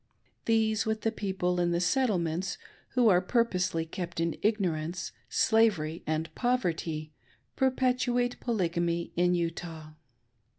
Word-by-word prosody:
These, 220 -1 +2
with 220 0 -1
the 225 - +1
people 190 -4 -1
in 175 0 +2
the 170 0 +1
Settlements, 180 -5 0 0.4
who 250 -2 +4
are 180 -4 +5
purposely, 185 -6 +1
kept 175 +1 -5
in 165 -1 0
ignorance, 180 -5 -1 0.2
slavery, 190 -8 +2
and 155 +1 -2
poverty, 165 -11 -1 0.4
perpet 260 -1 +2
uate 245 0 0
Polygamy 170 -6 -1
in 180 +1 +3
Utah. 165 -2 -4
180 Hz, 120 wpm, -29 LUFS, 170-225 Hz, 0.4 s, are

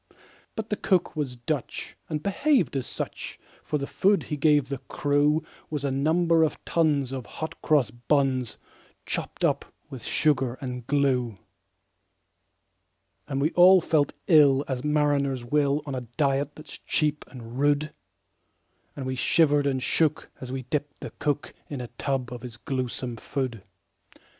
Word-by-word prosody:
But 220 -1 -5
the 210 - +1
cook 180 -5 +1
was 140 -5 -2
Dutch, 125 +3 -4
and 155 -1 -3
behaved 200 - +2
as 130 -2 -2
such; - - -5 0.2
For 150 - -1
the 140 - -3
food 195 +7 +2
that - - -11
he 150 - -1
gave 145 -2 +3
the 140 -2 -3
crew 145 +2 +2 0.3
Was 150 -2 -3
a 140 - 0
number 165 +4 +3
of 160 - +2
tons 150 -6 +1
of 130 -3 -5
hot 160 - -6
cross 145 -8 +3
buns, 130 0 0 0.5
Chopped - - -2
up - - +1 0.3
with 130 -3 -7
sugar 135 -5 +1
and 125 -3 -6
glue. 130 -6 +1 1.9
And 135 -1 -2
we 150 +4 +2
all 185 +2 +8
felt 155 -4 +1
ill 145 -4 +6
as 130 -2 -3
mariners 145 -4 +1
will, 145 +2 +1
On 140 - -4
a 130 - -2 0.2
diet 140 -1 +1
that's 155 -2 -11
cheap 150 -1 0
and 120 -1 -9
rude; 145 +1 +2 1.0
And 135 - -5
we 130 0 -2
shivered 145 +2 +3
and 130 -2 0
shook 155 +1 +1
as 130 -1 -6
we 130 0 -4
dipped 145 +3 -3
the - - -6
cook 145 0 -1 0.2
In 145 - -4
a 120 -1 -6
tub 130 -3 -1
of 120 - -7
his 120 -3 -9
gluesome 125 -1 -3
food. 125 -2 -3
140 Hz, 155 wpm, -26 LUFS, 130-150 Hz, 1.9 s, all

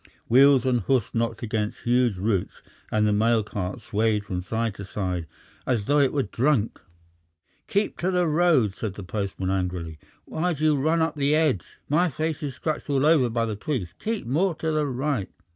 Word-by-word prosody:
Wheels 135 +1 +6
and 125 -2 +2
hoofs 120 +2 0
knocked 115 0 -1
against 110 -2 -2
huge 120 -4 +2
roots, 100 -1 -2 0.3
and 105 0 +2
the 105 - +2
mail 110 +1 +3
cart 95 -3 -5
swayed 105 -1 0
from 90 -2 -3
side 110 +3 -2
to 100 - -8
side 90 -4 -3 0.4
as 115 -6 0
though 145 +4 +3
it 140 -2 +3
were 140 -2 0
drunk. 120 0 0 0.9
"Keep 205 -1 -1
to 180 - 0
the 180 -2 +2
road," 155 - +3
said 100 -1 -5
the 100 - -7
postman 95 -1 -3
angrily. 90 -4 -3 0.3
"Why 175 +2 -1
do 155 0 -5
you 155 -1 +4
run 160 +4 +2
up 160 -2 -2
the 145 +1 +2
edge? 145 - 0
My 170 +5 +2
face 155 +2 -3
is 140 -4 -4
scratched 155 +1 -3
all 140 0 +2
over 150 -6 +4
by 115 0 0
the 110 -2 -3
twigs! 105 - -3
Keep 220 -1 -3
more 165 +8 +1
to 160 +1 -2
the 155 -1 +1
right!" 130 -5 -2
120 Hz, 195 wpm, -25 LUFS, 105-150 Hz, 0.9 s, Wheels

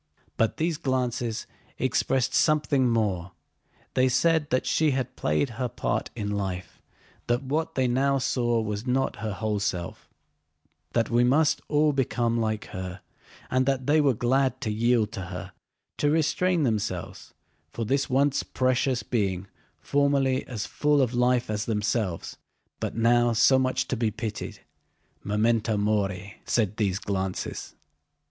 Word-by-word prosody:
But 115 - +1
those 165 -1 0
glances 125 -6 -1 0.3
expressed 130 -2 +1
something 145 -4 +3
more: 95 -6 0 0.6
they 130 0 +3
said 160 +3 +2
that 130 - +1
she 155 -1 +2
had 130 -2 -2
played 75 - 0
her 125 - +1
part 120 - -2
in 105 -3 -3
life, 95 -4 -4 0.5
that 120 +2 +1
what 150 +4 -2
they 130 -1 +2
now 135 +3 +2
saw 120 -3 +1
was 105 +2 -4
not 130 +1 0
her 105 0 -3
whole 105 +1 -1
self, 90 -4 -4 0.8
that 115 -2 +1
we 120 +1 +4
must 145 +5 +3
all 150 0 +3
become 120 -3 0
like 110 -2 -1
her, 95 0 -6 0.5
and 130 +1 +2
that 135 -2 0
they 150 +3 +4
were 140 -4 +3
glad 130 +4 +1
to 110 - -1
yield 115 0 +2
to 95 -4 -5
her, 90 +1 -7 0.5
to 145 - +3
restrain 165 +2 +2
themselves 110 -7 -3 0.3
for 115 +7 -4
this 135 +5 0
once 140 +2 +2
precious 130 0 0
being 100 -5 -1 0.3
formerly 140 -2 +1
as 110 -6 -4
full 150 -1 +1
of 125 -1 -1
life 125 0 +2
as 105 -1 -2
themselves, 105 -4 -1 0.4
but - - -3
now 120 +1 +3
so 130 +4 +5
much 130 0 0
to - - -1
be 115 -1 +1
pitied. 110 0 -5 0.6
"Memento 110 +1 +1
mori," 100 -2 -1
said 105 -3 0
these 100 -4 +1
glances. 95 -2 -4
120 Hz, 145 wpm, -26 LUFS, 105-135 Hz, 0.8 s, so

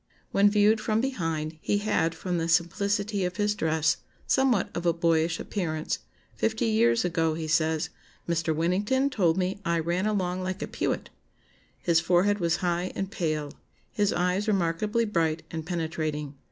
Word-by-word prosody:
When 200 +1 +5
viewed 210 +1 +4
from 215 0 +1
behind 165 - -2
he 205 - +1
had, 205 -6 0
from 180 -2 -2
the 165 - -1
simplicity 200 +4 +1
of 180 +1 -2
his 210 0 +2
dress, 160 -3 +1 0.3
somewhat 265 -7 +2
of 175 0 -1
a 170 - +4
boyish 165 0 +1
appearance: 160 -6 -2 0.4
fifty - - 0
years 115 +5 +3
ago, 165 -2 +1
he 160 -1 -4
says, 160 +1 +1 0.4
'Mr. 165 -2 0
Winnington 205 - +1
told 180 -7 +2
me 190 +2 -1
I 170 -3 +1
ran 170 +5 0
along 185 -3 -1
like 185 +1 -3
a - - -4
pewet.' - - -2 0.7
His 170 -2 +2
forehead 185 +5 +2
was 170 -2 +2
high 175 +1 0
and 195 0 -3
pale. 155 -5 -2 0.4
His 205 -1 +1
eyes 180 +4 0
remarkably 210 +4 +1
bright 165 -6 0
and 160 -1 -5
penetrating. 155 -4 -3
175 Hz, 160 wpm, -27 LUFS, 160-205 Hz, 0.7 s, When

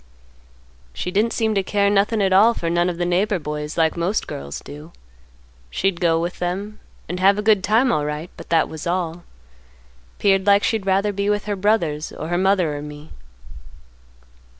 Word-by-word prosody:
"She 180 - -4
didn't 215 +4 +1
seem 220 -2 0
to 200 - +1
care 200 +1 +1
nothin' 205 +2 +2
at 190 -1 +2
all 220 +5 +5
for 165 -1 -2
none 175 +1 +2
of 175 - -4
the 175 - -1
neighbor 190 +4 +1
boys 150 -1 -5
like 160 -1 +2
most 175 +5 -1
girls 70 +1 -6
do; 150 +3 -11 0.8
she'd 175 - -1
go 165 -2 +3
with 175 +2 -4
them 195 +4 -4 0.3
and 180 - -4
have 195 +2 +4
a 210 - -2
good 210 -3 +3
time 230 +5 +3
alright, 150 0 -2
but - - -12
that 165 -1 +3
was 160 +2 -7
all. 175 -1 -2 0.9
'Peared 195 -1 +2
like 200 0 +5
she'd 220 -4 -1
rather 195 +2 +2
be 200 +1 -1
with 205 -1 0
her 205 -1 -2
brothers 185 -7 0
or 155 - -7
her 175 - 0
mother 185 -5 +2
or 145 - -5
me. 150 +1 -10
185 Hz, 185 wpm, -21 LUFS, 165-205 Hz, 0.9 s, all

